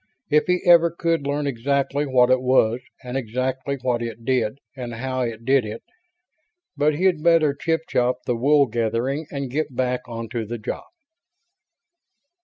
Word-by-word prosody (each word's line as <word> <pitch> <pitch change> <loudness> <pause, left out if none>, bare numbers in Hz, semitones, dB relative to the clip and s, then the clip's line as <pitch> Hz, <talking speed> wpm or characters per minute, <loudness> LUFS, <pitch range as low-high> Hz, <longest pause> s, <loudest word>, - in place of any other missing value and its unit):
If 150 +3 +3
he 180 0 +1
ever 170 -1 +7
could 165 -3 -1
learn 145 +1 -1
exactly 140 +2 0
what 130 -1 +4
it 130 0 +4
was 125 -2 +3 0.2
and 125 0 -6
exactly 130 +2 -2
what 125 -2 0
it 115 0 -6
did 125 -2 0 0.2
and 120 -3 -6
how 130 +2 -3
it 115 -2 -4
did 135 0 +4
it... 110 +1 -7 0.9
but 150 +1 +2
he'd 180 -1 +2
better 165 -3 +4
chip 160 +3 -1
chop 125 +1 +1
the 125 - 0
wool 140 +4 +4
gathering 120 +5 -1
and 140 -3 -5
get 145 -1 -2
back 125 0 0
onto 115 0 -4
the 115 +2 -5
job. 110 - -5
130 Hz, 160 wpm, -23 LUFS, 120-145 Hz, 0.9 s, ever